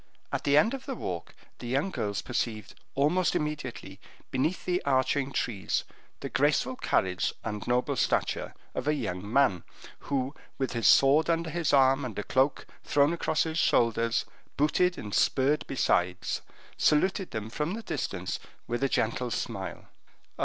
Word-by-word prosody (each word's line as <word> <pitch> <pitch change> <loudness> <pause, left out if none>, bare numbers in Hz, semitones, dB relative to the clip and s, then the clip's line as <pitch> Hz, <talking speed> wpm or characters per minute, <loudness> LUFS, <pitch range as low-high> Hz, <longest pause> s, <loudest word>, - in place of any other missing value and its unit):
At - - -2
the 145 0 +4
end 220 - +4
of 270 -1 -6
the 265 - -3
walk 85 - -5 0.2
the 120 - -7
young 135 +10 0
girls 105 - -2
perceived 115 -3 -3 0.2
almost 155 +6 +2
immediately, 130 -10 -4 0.3
beneath 145 +7 -1
the 180 0 0
arching 135 0 +1
trees, 105 -8 -1 0.4
the - - -3
graceful 145 -3 +2
carriage 95 -6 0
and 105 -1 -4
noble 125 +1 +1
stature - - 0 0.2
of 130 - -4
a 150 - +3
young 100 -6 -4
man, 125 -10 +3 0.5
who, 135 -1 0 0.2
with 135 - -2
his 115 -1 +2
sword 145 +4 +6
under 165 -1 0
his 170 -2 0
arm 135 0 +5
and 120 -5 -5
a 105 - -2
cloak 130 +5 +1 0.2
thrown 145 +3 +3
across 165 -2 +1
his 160 0 -2
shoulders, 115 0 +2 0.3
booted 175 +5 +2
and 105 -1 -6
spurred 140 +3 +2
besides, 90 -8 0 0.4
saluted 185 +5 +2
them 110 0 -5
from 150 - -2
the 230 - -7
distance 95 - -3 0.3
with 120 +3 -2
a 135 - +2
gentle 120 +2 0
smile. - - -4
135 Hz, 155 wpm, -28 LUFS, 115-150 Hz, 0.5 s, sword